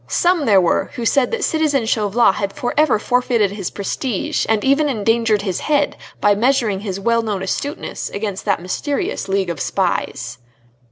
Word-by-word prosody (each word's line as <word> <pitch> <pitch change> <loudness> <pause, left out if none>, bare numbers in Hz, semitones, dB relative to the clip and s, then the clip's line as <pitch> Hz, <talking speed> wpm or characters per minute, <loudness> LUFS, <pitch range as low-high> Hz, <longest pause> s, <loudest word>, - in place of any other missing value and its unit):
Some 350 -4 +2
there 200 -3 +6
were 175 -2 +1
who 240 -3 -4
said 260 +2 +3
that 465 -3 -2
citizen 300 -6 +1
Chauvelin 215 -1 +2
had 200 0 -3
for 245 - -3
ever 300 -6 +4
forfeited 235 -3 +1
his 200 -3 -4
prestige, 205 +2 -2
and 220 -2 +2
even 285 +2 +3
endangered 225 -2 +1
his 190 -4 -2
head 295 -1 +1 0.2
by 205 - +4
measuring 230 -2 +1
his 195 -2 -4
well 230 +3 +2
known 205 -4 -3
astuteness 285 - -4
against 200 -2 -4
that 200 -4 0
mysterious 275 +6 -2
League 190 -2 0
of 170 - -6
spies. 125 -10 -2
220 Hz, 170 wpm, -19 LUFS, 195-265 Hz, 0.2 s, there